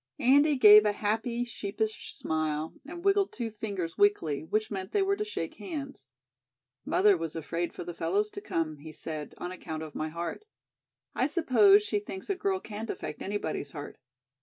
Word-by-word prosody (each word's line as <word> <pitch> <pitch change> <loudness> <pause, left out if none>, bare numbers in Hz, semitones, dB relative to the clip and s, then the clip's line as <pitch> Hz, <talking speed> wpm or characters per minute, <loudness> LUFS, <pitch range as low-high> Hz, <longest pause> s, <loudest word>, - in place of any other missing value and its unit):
Andy 285 +4 +5
gave 210 -4 +9
a 210 -1 +2
happy, 225 +4 -1
sheepish 220 -1 -4
smile 155 0 -2
and 345 +3 -8
wiggled 395 0 +3
two 235 -2 -4
fingers 200 -6 -4
weakly, 405 - +3
which 215 +7 -1
meant 190 -2 -5
they 400 - +3
were 395 +1 +2
to 420 - -2
shake 425 - -5
hands. 280 - -6 0.8
"Mother 205 0 +4
was 165 -2 -4
afraid 165 +2 -2
for - - -7
the 175 0 -6
fellows 415 - 0
to 405 - -7
come," 165 - -2
he 155 +2 -9
said, 155 -1 -6
"on 175 - -5
account 160 -3 -6
of 155 -2 -8
my 155 - -3
heart. 170 - -5 0.7
I 260 - +1
suppose 390 +6 +5
she 415 0 0
thinks 400 0 -6
a - - 0
girl 380 0 0
can't 220 - -7
affect 150 - -5
anybody's 195 -7 -3
heart." 145 -2 -8
215 Hz, 180 wpm, -29 LUFS, -, 0.8 s, gave